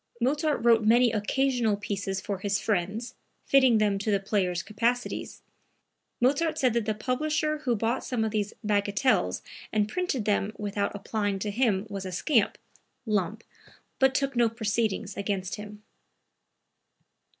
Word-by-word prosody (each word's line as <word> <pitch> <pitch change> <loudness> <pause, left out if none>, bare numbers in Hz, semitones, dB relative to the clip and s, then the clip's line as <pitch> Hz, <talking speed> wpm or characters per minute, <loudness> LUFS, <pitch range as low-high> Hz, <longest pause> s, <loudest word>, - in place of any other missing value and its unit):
(Mozart 290 +1 +1
wrote 230 -2 +5
many 235 +2 +5
occasional 230 0 +1
pieces 195 -2 -3
for 195 0 -4
his 200 +1 0
friends, 210 +3 -2 0.3
fitting 260 -4 +5
them 205 -2 +2
to 205 - -2
the 200 -1 +3
players' 190 -3 0
capacities. 235 +3 -2 0.8
Mozart 290 +6 +2
said 255 -3 +2
that 235 -2 0
the 215 -1 -1
publisher 305 +6 -1
who 255 -6 0
bought 225 +3 -1
some 245 -4 -1
of 220 - -1
these 210 -1 -1
"bagatelles" 205 +4 +1 0.3
and 210 -1 +1
printed 315 - -2
them 205 0 +1
without 205 -1 -2
applying 205 -1 -2
to 205 +2 -3
him 210 -3 +1
was 195 -2 -5
a - - -5
scamp 225 - +1 0.5
(Lump), 215 0 -1 0.6
but 265 0 +4
took 275 -1 0
no 235 -1 +4
proceedings 220 -2 -1
against 195 -2 -2
him.) 210 0 -10
215 Hz, 145 wpm, -27 LUFS, 205-245 Hz, 0.8 s, wrote